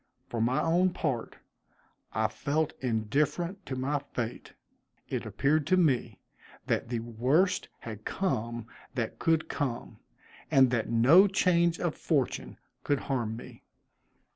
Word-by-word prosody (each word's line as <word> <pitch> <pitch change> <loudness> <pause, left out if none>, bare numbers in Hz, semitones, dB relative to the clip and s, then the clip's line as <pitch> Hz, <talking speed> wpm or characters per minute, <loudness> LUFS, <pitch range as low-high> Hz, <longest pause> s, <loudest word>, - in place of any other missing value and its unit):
For 115 - -2
my 125 +3 +2
own 175 +3 +3
part, 130 -10 -2 0.8
I 110 +1 +1
felt 140 +8 -1
indifferent 145 - -1
to 130 - -3
my 140 +3 0
fate. 125 -4 -5 0.5
It - - -3
appeared 145 +1 +1
to 185 +2 +4
me 125 - +2 0.5
that - - -1
the 120 -2 -2
worst 130 - +1
had 110 -2 -8
come 120 - -2 0.3
that 115 -4 -3
could 165 -1 +2
come, 120 - -3 0.5
and 130 -2 +5
that 120 -3 0
no 135 - +7
change 175 -3 +2
of 175 -3 0
fortune 140 -6 -1 0.3
could 145 -1 +1
harm 120 -5 -2
me. - - -11
135 Hz, 130 wpm, -29 LUFS, 115-165 Hz, 0.8 s, no